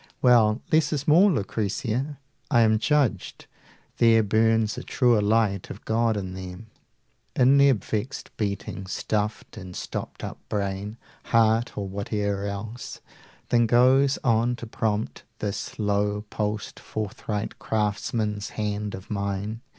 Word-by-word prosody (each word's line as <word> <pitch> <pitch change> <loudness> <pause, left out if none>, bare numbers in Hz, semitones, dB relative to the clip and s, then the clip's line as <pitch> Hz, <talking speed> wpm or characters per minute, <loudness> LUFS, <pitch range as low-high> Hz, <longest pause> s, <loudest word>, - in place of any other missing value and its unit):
Well, 115 -2 +4
less 155 -1 +3
is 145 -3 -2
more, 175 +7 +6
Lucrezia: 125 - -2 0.3
I 120 -5 +4
am 110 -1 +4
judged. 135 -7 0 0.5
There 115 -1 +5
burns 110 +1 +2
a - - -5
truer 120 -4 +2
light 105 -2 +1
of 100 - -9
God 115 -1 +1
in 95 -2 -4
them, 95 +3 -8 0.6
In 135 +2 +5
their 140 -1 +6
vexed 110 +5 -5
beating 100 -2 -3
stuffed 105 +3 -3
and 90 -3 -8
stopped - - -6
up - - -6
brain, 100 +1 -3 0.3
80 - - -16
Heart, 115 +1 +3
or 100 -1 -2
whate'er 100 0 -2
else, 105 +4 -6 0.5
than 120 -1 +4
goes 130 +4 +4
on 120 0 +2
to 120 - -8
prompt 110 -1 -2 0.2
This 105 -2 -4
low 105 0 0
pulsed 105 -1 -3
forthright 105 0 -4
craftsman's 105 0 -1
hand 105 -1 -2
of 95 +2 -11
mine. 100 +2 -3
110 Hz, 135 wpm, -25 LUFS, 100-120 Hz, 0.6 s, more